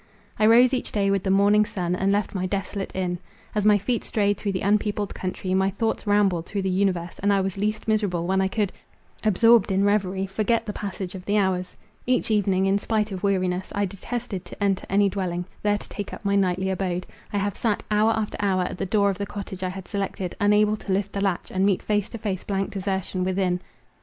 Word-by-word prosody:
I 215 Hz, -, +5 dB
rose 245 Hz, +3 st, +6 dB
each 255 Hz, -, -1 dB
day 200 Hz, -2 st, +1 dB
with 195 Hz, -1 st, +1 dB
the 190 Hz, -, -2 dB
morning 200 Hz, +2 st, +5 dB
sun, 180 Hz, -4 st, -2 dB
and 190 Hz, +2 st, +1 dB
left 205 Hz, 0 st, 0 dB
my 185 Hz, -2 st, -1 dB
desolate 195 Hz, 0 st, -3 dB
inn. 180 Hz, -2 st, -1 dB, 0.3 s
As 210 Hz, 0 st, +1 dB
my 210 Hz, -1 st, +6 dB
feet 220 Hz, +4 st, -1 dB
strayed 205 Hz, -1 st, +1 dB
through 200 Hz, 0 st, -3 dB
the 185 Hz, -, -2 dB
unpeopled 205 Hz, 0 st, +1 dB
country, 185 Hz, 0 st, -3 dB
my 190 Hz, +1 st, +3 dB
thoughts 220 Hz, +2 st, -2 dB
rambled 195 Hz, -5 st, +2 dB
through 200 Hz, -1 st, -2 dB
the 190 Hz, -, 0 dB
universe, 180 Hz, -3 st, 0 dB
and 205 Hz, +1 st, +2 dB
I 200 Hz, -, +3 dB
was 190 Hz, -1 st, -1 dB
least 215 Hz, +2 st, -2 dB
miserable 205 Hz, -6 st, +1 dB
when 190 Hz, +1 st, +2 dB
I 190 Hz, -, +2 dB
could, 200 Hz, 0 st, -1 dB, 0.5 s
absorbed 225 Hz, 0 st, +5 dB
in 195 Hz, +1 st, +2 dB
reverie, 195 Hz, -2 st, +1 dB
forget 220 Hz, +4 st, 0 dB
the 210 Hz, -, -4 dB
passage 195 Hz, -2 st, -5 dB
of 185 Hz, -2 st, -8 dB
the 205 Hz, +1 st, +1 dB
hours. 185 Hz, -2 st, 0 dB, 0.3 s
Each 250 Hz, -2 st, +1 dB
evening, 195 Hz, -3 st, +2 dB
in 195 Hz, +1 st, +2 dB
spite 215 Hz, 0 st, 0 dB
of 185 Hz, -2 st, -5 dB
weariness, 185 Hz, -2 st, 0 dB
I 205 Hz, 0 st, +1 dB
detested 200 Hz, 0 st, -5 dB
to -, -, -6 dB
enter 195 Hz, -2 st, 0 dB
any 200 Hz, +1 st, +4 dB
dwelling, 180 Hz, -2 st, -2 dB, 0.2 s
there 205 Hz, 0 st, +2 dB
to -, -, -9 dB
take 205 Hz, -, -6 dB
up -, -, -15 dB
my 200 Hz, 0 st, +2 dB
nightly 190 Hz, -1 st, +1 dB
abode—I 185 Hz, +1 st, -4 dB
have 200 Hz, 0 st, -1 dB
sat, 220 Hz, -4 st, 0 dB
hour 210 Hz, +1 st, +4 dB
after 220 Hz, -1 st, -2 dB
hour, 190 Hz, -2 st, +2 dB
at 180 Hz, -, -5 dB
the -, -, -1 dB
door 200 Hz, 0 st, +3 dB
of 195 Hz, -, -7 dB
the 200 Hz, -, -2 dB
cottage 195 Hz, -2 st, -7 dB
I 185 Hz, -, -1 dB
had 190 Hz, 0 st, -7 dB
selected, 195 Hz, -3 st, -3 dB
unable 210 Hz, +1 st, +3 dB
to 205 Hz, -, -6 dB
lift 200 Hz, +1 st, 0 dB
the 200 Hz, -, -2 dB
latch, 195 Hz, -3 st, -1 dB
and 190 Hz, 0 st, 0 dB
meet 195 Hz, -2 st, +2 dB
face 210 Hz, 0 st, 0 dB
to 230 Hz, -, -6 dB
face 200 Hz, -4 st, -3 dB
blank 195 Hz, +1 st, -2 dB
desertion 190 Hz, -2 st, -2 dB
within. 185 Hz, -1 st, 0 dB
200 Hz, 225 wpm, -25 LUFS, 190-210 Hz, 0.5 s, rose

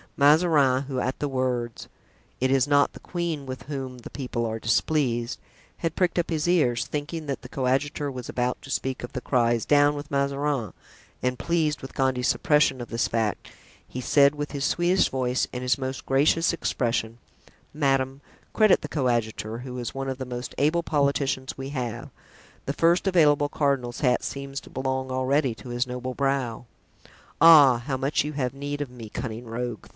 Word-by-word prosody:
Mazarin, 145 Hz, -3 st, +4 dB
who 135 Hz, -2 st, -3 dB
at 130 Hz, +1 st, -2 dB
the 145 Hz, -, -1 dB
words, 125 Hz, -3 st, -2 dB, 0.5 s
"It 130 Hz, +1 st, +1 dB
is 135 Hz, -1 st, +3 dB
not 145 Hz, -1 st, +3 dB
the -, -, -11 dB
queen 170 Hz, -5 st, -3 dB
with 130 Hz, 0 st, -6 dB
whom 135 Hz, -3 st, -6 dB
the 120 Hz, -, -10 dB
people 125 Hz, -3 st, -3 dB
are 110 Hz, 0 st, -3 dB
displeased," 120 Hz, 0 st, 0 dB, 0.4 s
had 165 Hz, -2 st, -2 dB
pricked 180 Hz, -1 st, +1 dB
up 170 Hz, -, -1 dB
his 160 Hz, -1 st, -1 dB
ears, 140 Hz, -10 st, +2 dB
thinking 150 Hz, +2 st, -4 dB
that 140 Hz, -2 st, -4 dB
the 125 Hz, -, -9 dB
coadjutor 140 Hz, +3 st, -1 dB
was 125 Hz, -2 st, -7 dB
about 125 Hz, 0 st, -1 dB
to -, -, -12 dB
speak 130 Hz, -2 st, -2 dB
of 120 Hz, -, -7 dB
the 125 Hz, -, -4 dB
cries, 120 Hz, -3 st, +1 dB
"Down 145 Hz, 0 st, +4 dB
with 145 Hz, +2 st, -7 dB
Mazarin," 140 Hz, -3 st, -1 dB, 0.5 s
and 125 Hz, 0 st, -1 dB
pleased 160 Hz, -3 st, 0 dB
with 135 Hz, -, -9 dB
Gondy's 130 Hz, -1 st, +1 dB
suppression 150 Hz, -4 st, +2 dB
of 120 Hz, -, -7 dB
this 115 Hz, +2 st, 0 dB
fact, 110 Hz, -2 st, -2 dB, 0.4 s
he 130 Hz, -, -6 dB
said 140 Hz, +2 st, +4 dB
with 145 Hz, 0 st, -4 dB
his 140 Hz, -2 st, -3 dB
sweetest 175 Hz, +2 st, +2 dB
voice 130 Hz, -1 st, 0 dB
and 125 Hz, 0 st, -4 dB
his 125 Hz, +2 st, +2 dB
most 130 Hz, 0 st, -5 dB
gracious 150 Hz, +5 st, +3 dB
expression: 115 Hz, -8 st, -1 dB, 0.6 s
"Madame, 135 Hz, -2 st, 0 dB, 0.3 s
credit 215 Hz, -3 st, +5 dB
the -, -, -5 dB
coadjutor, 115 Hz, -4 st, -1 dB
who 125 Hz, 0 st, -7 dB
is 120 Hz, -, -5 dB
one 135 Hz, 0 st, -3 dB
of 130 Hz, -, -3 dB
the 130 Hz, -, -3 dB
most 125 Hz, 0 st, -6 dB
able 155 Hz, +4 st, +2 dB
politicians 140 Hz, -3 st, 0 dB
we 135 Hz, 0 st, -5 dB
have; 125 Hz, -1 st, -4 dB, 0.6 s
the 140 Hz, -, -2 dB
first 170 Hz, +5 st, +2 dB
available 150 Hz, -5 st, +4 dB
cardinal's 135 Hz, -5 st, -1 dB
hat 125 Hz, -4 st, +2 dB
seems 140 Hz, 0 st, -5 dB
to -, -, -15 dB
belong 130 Hz, 0 st, -2 dB
already 130 Hz, 0 st, +1 dB
to 125 Hz, -, -11 dB
his 120 Hz, +1 st, -1 dB
noble 125 Hz, +1 st, -4 dB
brow." 130 Hz, -4 st, -1 dB, 0.7 s
"Ah! 145 Hz, -6 st, +8 dB
how 135 Hz, -2 st, -1 dB
much 135 Hz, +3 st, 0 dB
you 150 Hz, +1 st, -4 dB
have 130 Hz, -3 st, -2 dB
need 145 Hz, +1 st, -4 dB
of 145 Hz, -, -3 dB
me, 115 Hz, -3 st, -9 dB
cunning 115 Hz, +1 st, -5 dB
rogue!" 115 Hz, -1 st, -5 dB
135 Hz, 180 wpm, -25 LUFS, 125-145 Hz, 0.7 s, Ah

